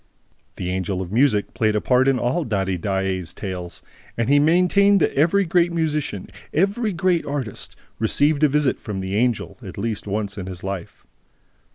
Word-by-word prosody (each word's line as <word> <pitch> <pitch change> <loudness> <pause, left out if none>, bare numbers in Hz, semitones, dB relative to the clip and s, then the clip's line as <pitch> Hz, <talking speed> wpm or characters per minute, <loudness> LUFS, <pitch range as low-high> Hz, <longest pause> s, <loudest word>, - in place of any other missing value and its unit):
The 90 - -3
Angel 95 0 -2
of 95 -1 -5
Music 115 -3 +2
played 110 -1 +1
a - - +3
part 125 +4 +3
in 135 -1 +3
all 125 +8 0
Daddy 95 -6 -1
Daae's 95 -1 -2
tales; 90 -3 -6 0.3
and 115 +1 0
he 145 +1 +5
maintained 180 +6 +4
that - - +1
every 175 +7 +3
great 175 0 +2
musician, 150 - -2 0.2
every 200 +6 +1
great 175 -1 +1
artist 135 -7 -4 0.2
received 145 +7 +2
a 150 - +6
visit 145 -1 +1
from 100 -3 -5
the 95 +1 -3
Angel 120 +1 0
at 95 -6 -9
least 105 0 -3
once 100 0 -3
in 95 - -6
his 90 -1 -8
life. 95 -2 -6
115 Hz, 175 wpm, -22 LUFS, 95-155 Hz, 0.3 s, a